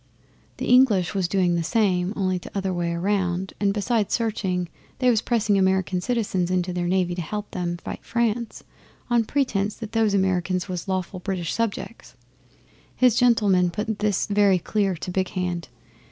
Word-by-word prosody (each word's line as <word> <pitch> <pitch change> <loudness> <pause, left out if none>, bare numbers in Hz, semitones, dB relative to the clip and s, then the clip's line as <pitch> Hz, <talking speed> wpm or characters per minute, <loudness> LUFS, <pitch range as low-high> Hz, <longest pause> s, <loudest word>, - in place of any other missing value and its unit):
The - - -3
English 235 -9 +4
was 190 -3 0
doing 180 -1 +1
the 170 - +1
same, 185 -1 +1
only 185 -2 0
t'other 190 +1 -3
way 170 -1 -1
round, 185 0 -1
and 200 -1 +2
besides 210 +1 0
searching, 190 -6 -1 0.3
they 250 -1 +3
was 225 -2 +2
pressing 215 -5 +1
American 190 -1 +1
citizens 200 -6 -1
into 180 0 0
their 175 -1 -1
Navy 180 -1 +1
to 175 - -3
help 210 +5 -5
them 175 -1 -3
fight - - -7
France, 235 -1 -1 0.5
on 235 -2 +3
pretence 215 -7 0
that 220 -2 -8
those 220 -3 +2
Americans 185 -1 0
was 180 -2 -5
lawful 185 0 -2
British 180 -3 -3
subjects. 230 0 -4 0.8
His 250 -2 +4
gentlemen 210 -8 +3
put 210 +4 -3
this 210 -2 +1
very 200 -2 +3
clear 195 +1 0
to 175 +2 -6
Big 185 0 -1
Hand. 175 -3 -2
195 Hz, 165 wpm, -24 LUFS, 180-215 Hz, 0.8 s, English